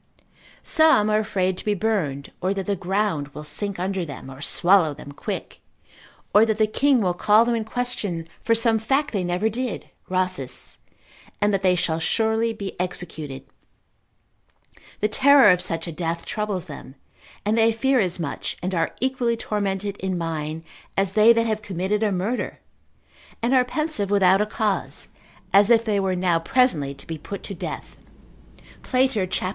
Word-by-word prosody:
Some 315 -10 +4
are 215 - +3
afraid 190 -4 -1
to - - -8
be 210 -1 +1
burned, 175 -10 -2
or 190 +2 0
that 195 -1 -3
the 200 - 0
ground 190 -5 -1
will 150 - -6
sink 200 +6 -3
under 185 +1 -2
them, 140 -4 -8
or 130 +1 -11
swallow 175 -2 +3
them 145 - -10
quick, 145 - -6 0.7
or 210 - +7
that 220 -1 +1
the 215 - +4
king 265 +3 +2
will 180 -3 +1
call 210 +5 +4
them 240 - +1
in 230 -1 -1
question 220 -8 -1 0.2
for 230 - +3
some 225 -1 +2
fact 270 +7 0
they 195 -4 -1
never 180 +4 0
did 240 +2 -4 0.2
(Rhasis 185 -8 -2 0.5
cont.) - - -34
and 205 0 +2
that 195 - +1
they 185 -1 +3
shall 165 -2 0
surely 220 +6 +1
be 200 -3 -6
executed. 160 -6 -4 1.6
The 210 - +3
terror 265 0 +6
of 180 0 +2
such 165 -2 -2
a 170 - -5
death 165 +1 -3
troubles 210 -4 -3
them, 145 -4 -10 0.5
and 210 +1 +2
they 225 0 +4
fear 260 +4 +2
as 185 -3 0
much 155 -4 -4
and 185 +1 -2
are 165 -2 -1
equally 250 -3 0
tormented 200 -2 -2
in 190 -1 -2
mind, 160 -1 -4 0.3
as 195 -1 +2
they 215 +2 +7
that 230 0 +3
have 215 -1 -1
committed 195 +1 -2
a 215 -2 +2
murder, 195 +7 -2 0.8
and 235 +3 0
are 255 -1 +5
pensive 275 -6 -1
without 195 -1 +4
a 210 - 0
cause, 210 -2 -2 0.4
as 200 +2 +6
if 230 -1 +5
they 210 -2 +1
were 190 -1 0
now 180 -2 +1
presently 165 - +1
to 135 - -9
be 160 -1 -6
put 200 +6 -7
to 200 - -6
death. 175 - -7 0.8
Plater, 255 -7 +1
cap. 185 0 -2
200 Hz, 175 wpm, -23 LUFS, 175-225 Hz, 1.6 s, or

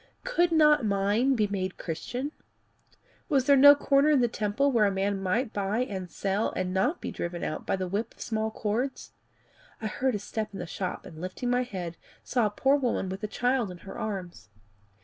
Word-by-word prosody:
Could 350 -9 +2
not 300 -3 +5
mine 210 +6 +2
be 215 -3 +2
made 190 -2 -3
Christian? 245 - -4 1.0
Was 270 -4 +2
there 280 0 +6
no 285 +2 +9
corner 280 +1 +3
in 295 -3 +5
the 240 - +3
temple 220 +6 0
where 220 -5 +4
a - - +1
man 195 0 -1
might 215 +6 0
buy 205 +3 0
and 190 -7 -4
sell 200 +4 -1
and 185 0 -2
not 200 - +1
be - - -4
driven 175 0 -4
out - - -4
by - - +2
the 185 -1 -3
whip 200 +5 -3
of - - -27
small 220 -1 -1
cords? 230 +5 -3 0.7
I 220 - -6
heard 255 +3 0
a - - +1
step 210 +1 -5
in 195 - -6
the 175 - -4
shop, 180 +2 -4
and 160 -1 -10
lifting 185 +7 -3
my 245 0 +3
head, 180 -8 -5 0.3
saw 240 -4 +1
a - - -2
poor 270 +7 +2
woman 245 -8 -1
with 190 +3 -6
a - - 0
child 245 0 0
in 180 - -8
her 195 - -8
arms. 180 - -5
215 Hz, 210 wpm, -28 LUFS, 190-255 Hz, 1.0 s, no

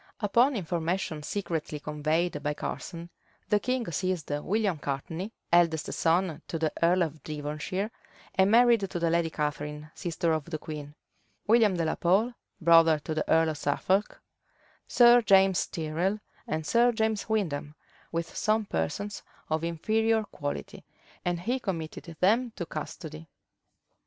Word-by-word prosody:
Upon 240 +6 +3
information 170 -3 -2
secretly 160 -3 -3
conveyed 155 +2 -1
by 150 0 -1
Curson, 170 +3 -6 0.4
the 210 - +4
king 250 +2 -1
seized 180 -2 -2
William 185 +4 0
Courtney, 160 +9 -4 0.2
eldest 165 -2 +3
son 165 -1 +1
to 165 - -3
the 160 -1 -1
earl 175 +2 +4
of 155 -2 -5
Devonshire, 155 +7 -4 0.4
and 190 +1 +4
married 235 +1 +6
to - - -4
the 165 -1 +1
lady 170 -1 +2
Catharine, 150 0 -4
sister 170 -2 -1
of 155 -2 -2
the 165 -2 -4
queen; 150 -1 -8 0.5
William 220 -4 +4
de 165 - 0
la 160 - +1
Pole, 200 +8 +2 0.3
brother 165 -1 +6
to 150 +1 -5
the 155 - -2
earl 160 0 +4
of 155 -2 -4
Suffolk; 190 +8 0 0.7
Sir 240 0 +7
James 195 -3 +4
Tyrrel, 170 +6 -1 0.3
and 155 0 -2
Sir 240 +5 +4
James 220 -2 -1
Windham, 155 -9 -1 0.4
with 165 0 -3
some 215 0 +1
persons 200 - -3 0.3
of 155 +1 0
inferior 220 +7 +1
quality; 145 -8 -6 0.4
and 175 -1 -1
he 245 +7 -1
committed 165 -9 -4
them 225 +5 +3
to 175 - -4
custody. 155 0 -7
170 Hz, 140 wpm, -28 LUFS, 155-205 Hz, 0.7 s, Sir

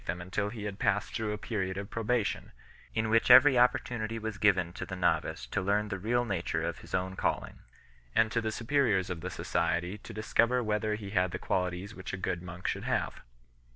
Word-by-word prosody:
them 90 - -2
until 100 +3 -2
he 110 -1 -7
had 105 -1 -5
passed 105 -3 +1
through 110 -1 -2
a 105 - -2
period 95 -5 -3
of 100 0 -5
probation, 115 -1 -1 0.4
in 110 0 +1
which 115 +1 +3
every 145 -3 +9
opportunity 120 -2 +2
was 110 -2 -5
given 90 -5 +3
to - - -6
the 95 - -5
novice 85 -8 0
to - - -2
learn 105 +2 +1
the 100 -2 -3
real 120 +5 +1
nature 95 -6 -1
of - - -3
his - - -5
own 95 0 -2
calling, - - -2 0.6
and 110 -1 +4
to 115 - +1
the 110 -1 -2
superiors 115 -6 +1
of 85 -2 -4
the 90 - -4
society 90 +2 -1
to - - -10
discover 115 +3 +2
whether 105 0 0
he 100 -2 -7
had 90 -2 +2
the - - -4
qualities 90 +2 -2
which 95 - -7
a - - -2
good 90 -2 -2
monk 90 0 -6
should - - -2
have. - - -1
105 Hz, 210 wpm, -30 LUFS, 95-110 Hz, 0.6 s, every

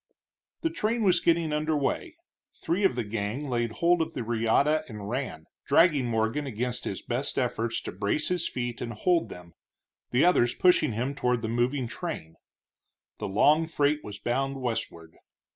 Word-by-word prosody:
The 330 - 0
train 230 -7 0
was 180 -3 +4
getting 165 -2 +2
under 155 0 0
way; 315 - -2 0.4
three 185 +5 -1
of 190 - +3
the 120 - -1
gang 110 +6 -3
laid 120 -3 -1
hold 170 +4 +3
of 160 - -3
the 125 - -2
reata 120 +7 +2
and 105 -3 -7
ran, 120 - -4 0.2
dragging 150 -7 +4
Morgan 115 +5 0
against 125 +1 -3
his 95 - -4
best 125 +4 -2
efforts 120 -3 0
to - - -6
brace 100 +10 -1
his 180 -2 0
feet 120 -1 -4
and 120 -1 -4
hold 170 - +1
them, 90 -1 -11 0.6
the 125 +6 +3
others 120 -9 +3
pushing 175 -8 +4
him 125 +6 -2
toward 125 -4 0
the 110 - -2
moving 120 +3 0
train. 115 - -6 0.8
The - - -3
long 150 +11 +4
freight 150 -2 +1
was 105 -1 -7
bound 135 +5 -1
westward. 85 -10 -4
125 Hz, 170 wpm, -27 LUFS, 115-155 Hz, 0.8 s, was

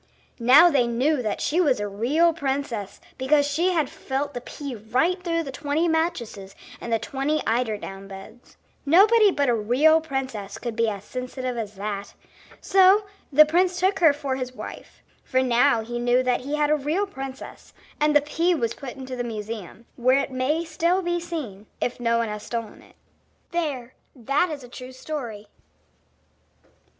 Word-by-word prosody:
Now 280 +9 +7
they 255 -5 +3
knew 255 +5 +1
that 215 -3 -3
she 335 +5 +1
was 280 -10 +2
a 205 - -2
real 275 +12 +2
princess 270 - -3 0.2
because 285 +2 +3
she 320 +6 +1
had 315 -5 +1
felt 280 +3 -4
the 245 - -5
pea 280 +2 -7
right 255 - 0
through 335 -2 0
the 275 - -6
twenty 295 +5 -1
mattresses 240 - -2 0.3
and 235 - -6
the 225 - +3
twenty 275 +6 -2
eider 225 -2 0
down 195 -1 -9
beds. 200 +5 -13 0.3
Nobody 410 +8 +6
but 285 -6 0
a 245 - +3
real 255 +9 +4
princess 260 -9 -4
could 235 -1 -5
be 230 -1 +2
as 200 -2 -6
sensitive 255 +1 -5
as 215 -3 -5
that. 200 0 -5 0.5
So 390 +2 +5 0.3
the 305 +2 +8
prince 355 +3 +1
took 385 +2 +1
her 325 -4 +6
for 280 -2 -3
his 255 -1 -5
wife, - - -10 0.2
for 260 -1 +1
now 245 0 +3
he 240 +2 -5
knew 245 +1 +2
that 250 -1 +1
he 280 +4 -3
had 300 0 +1
a - - +5
real 305 +8 -1
princess; 270 -8 -9 0.3
and 300 0 +2
the 295 - +7
pea 335 +4 +1
was 235 -6 -1
put 270 -3 -8
in 265 - -8
the 255 -1 -4
museum, 220 -1 -7
where 255 +2 +4
it 275 - -1
may 280 +6 0
still 335 +4 0
be 345 0 0
seen, 275 - -6
if 245 - -2
no 235 -1 +1
one 230 -1 0
has 210 0 -5
stolen 230 -1 -6
it. - - -21 0.6
There, 280 -8 -3 0.2
that 275 +8 0
is 295 -4 -6
a - - -10
true 255 +1 -10
story. 255 -7 -6
265 Hz, 180 wpm, -24 LUFS, 235-310 Hz, 0.6 s, the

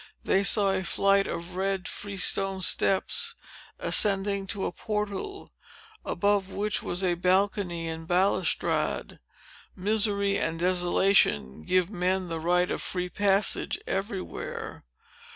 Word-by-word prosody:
They 195 - +2
saw 200 -1 +5
a 190 -1 -1
flight 195 +2 +2
of 170 +2 -6
red 190 0 -1
freestone 195 -1 -1
steps, 190 +1 +1 0.4
ascending 200 -1 +1
to 195 0 -3
a - - -2
portal, 210 - -4 0.5
above 200 +1 0
which 205 -1 -2
was 180 +2 -2
a 180 -2 +2
balcony 180 -1 0
and 160 0 -5
balustrade. 185 +3 0 0.6
Misery 200 0 +1
and 165 0 -1
desolation 175 - +2
give 185 +1 +1
men 185 -1 -1
the 165 -1 -3
right 180 +2 +1
of - - -2
free 180 -1 -3
passage 200 +1 +2
everywhere. 195 - -5
190 Hz, 115 wpm, -27 LUFS, 180-200 Hz, 0.6 s, saw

